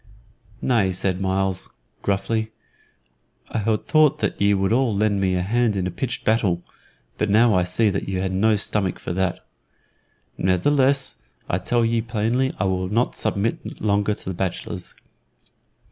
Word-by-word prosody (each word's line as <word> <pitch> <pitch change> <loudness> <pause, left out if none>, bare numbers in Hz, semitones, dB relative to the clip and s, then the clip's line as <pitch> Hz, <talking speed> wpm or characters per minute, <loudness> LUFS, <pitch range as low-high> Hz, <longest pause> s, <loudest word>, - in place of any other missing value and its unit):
"Nay," 110 -7 +2
said 95 +1 -1
Myles, 95 -1 0 0.3
gruffly. 110 +3 -1 1.0
"I - - -1
had 105 0 0
thought 155 -2 +4
that 105 -2 -2
ye 100 0 +4
would 95 +2 +1
all 120 -3 +2
lend 100 -1 +1
me 95 -1 +1
a 90 - 0
hand 115 +2 +1
in 95 -2 -1
a 90 - -2
pitched 120 +7 -4
battle 100 -6 +1 0.6
but - - +1
now 110 +2 +5
I 90 - +3
see 100 +5 +2
that 95 - -3
ye 95 -1 -1
ha' 95 - -1
no 105 +4 +3
stomach 100 -2 -1
for - - -4
that. 95 0 -1 0.9
Ne'theless, 135 +9 +2 0.3
I 90 - 0
tell 120 +5 +1
ye 115 0 +1
plainly 115 +4 0
I - - +1
will 95 -1 -1
not 115 +4 +1
submit 105 +3 -2
longer 105 0 +1
to - - -8
the 95 - -3
bachelors. 90 0 -4
100 Hz, 160 wpm, -23 LUFS, 95-115 Hz, 1.0 s, now